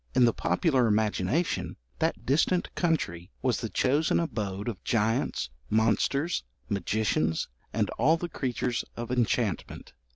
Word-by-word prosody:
In 125 -1 +6
the 115 - +3
popular 135 -8 +2
imagination, 110 - 0 0.2
that - - 0
distant 160 +6 +2
country 95 - -1
was 125 -5 +1
the 115 - -3
chosen 145 +8 +2
abode 105 - -3
of 105 -7 -4
giants, 110 - 0 0.2
monsters, 115 - +2 0.2
magicians, 95 -4 0 0.2
and - - +1
all 155 +8 +5
the 175 - -3
creatures 125 -5 -2
of 120 +1 -4
enchantment. 120 -7 -1
115 Hz, 125 wpm, -28 LUFS, 105-140 Hz, 0.2 s, In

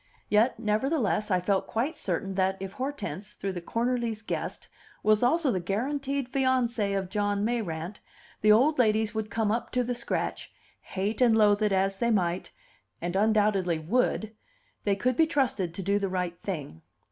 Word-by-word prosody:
Yet, 220 +5 +3
nevertheless, 215 0 0
I 185 -2 +3
felt 190 +2 0
quite 250 +8 -1
certain 190 +1 -2
that, 190 0 +1
if 190 0 -6
Hortense, 255 - -5
though 195 - -3
the 180 -2 -5
Cornerlys' 230 +1 -1
guest, - - -4 0.4
was 215 0 +4
also 285 +3 +3
the 185 - 0
guaranteed 270 +8 -2
fiancee 250 -5 +1
of 195 -1 -1
John 205 0 0
Mayrant, 200 -6 -3 0.4
the 215 - +5
old 260 +7 +4
ladies 220 -2 +2
would 220 -1 -3
come 220 -2 0
up 235 +1 -1
to 250 0 +2
the 245 +1 -2
scratch, 240 -1 -3 0.3
hate 200 +5 -3
and 235 -3 +5
loathe 205 -1 +4
it 210 -1 +2
as 195 0 +1
they 235 +3 +1
might, 180 -5 0 0.5
and 175 +1 -3
undoubtedly 205 -4 +2
would: 215 +5 0 0.5
they 200 -1 +3
could 250 +5 0
be 320 +3 +4
trusted 260 - 0
to 195 - -4
do 200 +2 +2
the 195 -1 -1
right 180 -2 -3
thing. 145 - -5
210 Hz, 170 wpm, -28 LUFS, 195-240 Hz, 0.5 s, the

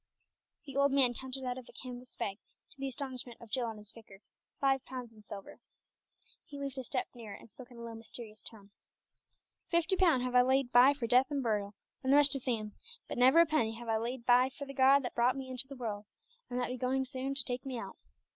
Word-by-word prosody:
The 275 -2 -9
old 280 0 +4
man 265 -3 +4
counted 260 +2 -6
out 250 0 -2
of 250 - -13
a - - -14
canvas 250 -1 -9
bag, 205 -3 -3 0.3
to 280 - -20
the 275 - -2
astonishment 255 -2 -5
of 235 -3 -13
Jill 245 -3 +1
and 220 - -7
his 210 0 -9
vicar, 205 -4 -14 0.4
five 270 -1 +2
pounds 250 -3 -7
in 215 - -16
silver. 205 -1 -9 0.8
He 285 - -10
moved 275 -1 -4
a - - -4
step 255 +1 -2
nearer 225 -5 -8
and 225 - -15
spoke 255 -1 -12
in 245 - -14
a 235 - -8
low, 230 0 -6
mysterious 225 -1 -8
tone 205 -3 -8 1.0
"Fifty 340 +1 +2
pun 340 -9 +4
have 250 0 -2
I 250 - +7
laid 260 0 +2
by 255 +4 +7
for 265 -4 -3
death 250 +3 +4
and 285 -2 -1
burial, 205 -3 -1 0.3
and 260 - +2
the 280 - +7
rest 290 -1 +6
to 275 - 0
Sam, 225 -5 -2 0.3
but - - -4
never 260 +7 +7
a - - +6
penny 265 -8 +1
have 235 0 -8
I 220 - +3
laid 235 +2 -4
by 250 +1 +5
for 280 +1 -7
the 275 - -8
God 275 +1 +5
that 245 - -4
brought 245 +3 +2
me 265 -1 -6
into 255 +1 -3
the 275 - -9
world, 215 -5 -4 0.4
and 245 - -2
that 245 - +1
be 250 0 -4
soon 260 +2 +1
going 265 +1 -3
to 270 - +4
take 250 0 -3
me 265 -2 -4
out. - - -6
250 Hz, 240 wpm, -33 LUFS, 235-270 Hz, 1.0 s, I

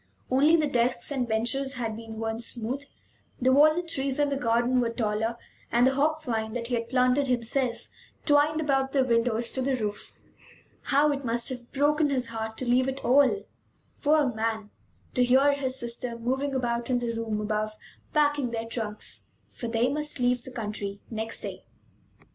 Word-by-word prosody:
Only 290 +5 +5
the 315 -2 +2
desks 245 -1 0
and 255 -4 -1
benches 240 +5 0
had 230 -3 -3
been 225 0 -8
worn 225 0 -3
smooth; 240 +4 -2 0.5
the 260 +1 +3
walnut 310 +5 +5
trees 270 -4 -1
in 290 -1 +2
the 280 - -1
garden 240 0 +2
were 235 - 0
taller, 225 0 -1 0.3
and 240 +1 +4
the 265 - +4
hop 310 +3 +1
vine, 220 -4 -2
that 240 -1 -3
he - - -2
had 230 -1 -1
planted 255 +2 +2
himself 245 0 0 0.4
twined 295 +1 +4
about 270 -3 0
the 270 -2 +4
windows 230 -1 +1
to 260 - -2
the 265 +1 +1
roof. 210 -4 -4 0.7
How 290 +1 +3
it 280 -1 -3
must 235 +1 0
have 245 -2 -7
broken 295 +2 +2
his 255 -4 0
heart 220 -1 -5
to 255 - -3
leave 255 +2 +3
it 270 +1 -6
all, 280 - +4 0.6
poor 295 -4 +3
man; 220 -1 -2 0.4
to 250 - +3
hear 265 +3 +5
his 265 -2 -2
sister 235 0 -2
moving 265 +4 -1
about 240 -1 -1
in 250 - +2
the 240 -1 -2
room 225 -2 -2
above, 215 0 -1 0.4
packing 290 -4 +2
their 230 -1 -3
trunks! 220 -2 -4 0.2
For 235 - -6
they 230 +1 +1
must 300 +1 -1
leave 245 0 +2
the 260 - -8
country 210 -4 -5
next 225 0 -3
day. - - -6
250 Hz, 180 wpm, -27 LUFS, 230-275 Hz, 0.7 s, Only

